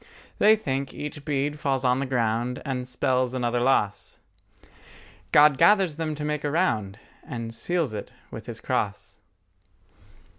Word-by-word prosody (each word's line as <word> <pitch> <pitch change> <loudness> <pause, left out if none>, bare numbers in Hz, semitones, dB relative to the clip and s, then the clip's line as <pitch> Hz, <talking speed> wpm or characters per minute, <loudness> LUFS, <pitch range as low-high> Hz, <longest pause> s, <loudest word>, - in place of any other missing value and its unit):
They 215 +1 +7
think 135 -9 -3
each 145 0 -6
bead 145 0 -1
falls 135 -2 0
on 125 +1 +3
the 135 - -2
ground 120 0 0
And 125 -3 -3
spells 130 0 0
another 120 -1 0
loss: 120 -5 0 1.1
God 150 -2 +6
gathers 195 -7 +4
them 155 -2 -2
to 150 0 -4
make 150 0 -2
a 145 - 0
round 110 - 0 0.3
And 115 -2 -6
seals 160 +2 -1
it 105 - -6 0.2
with - - -9
His - - -6
cross. - - -3
135 Hz, 145 wpm, -25 LUFS, 125-150 Hz, 1.1 s, They